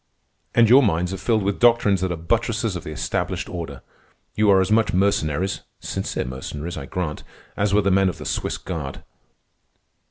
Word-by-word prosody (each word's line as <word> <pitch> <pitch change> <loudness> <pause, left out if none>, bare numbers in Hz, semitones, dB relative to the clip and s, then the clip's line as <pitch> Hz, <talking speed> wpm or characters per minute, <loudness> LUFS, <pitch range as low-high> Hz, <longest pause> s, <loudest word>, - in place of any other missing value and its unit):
"And 120 -1 +6
your 130 +5 +7
minds 90 -5 +1
are - - -3
filled 110 +2 +1
with 100 0 -1
doctrines 115 -6 +4
that 95 -1 0
are - - -1
buttresses 110 +4 -1
of 90 - -5
the - - -7
established 75 - -2
order. - - -6 0.5
You 105 0 +2
are 95 -1 +6
as 95 +2 +1
much 110 0 +3
mercenaries 95 -2 +1 0.2
(sincere - - -3
mercenaries, 75 +6 -6
I 70 - -7
grant) 85 -5 -4 0.3
as 100 0 0
were 105 +1 +4
the 100 - +2
men 95 0 +4
of 90 - -6
the - - -9
Swiss - - -2
Guard. 75 -7 -6
95 Hz, 185 wpm, -23 LUFS, 85-105 Hz, 0.5 s, your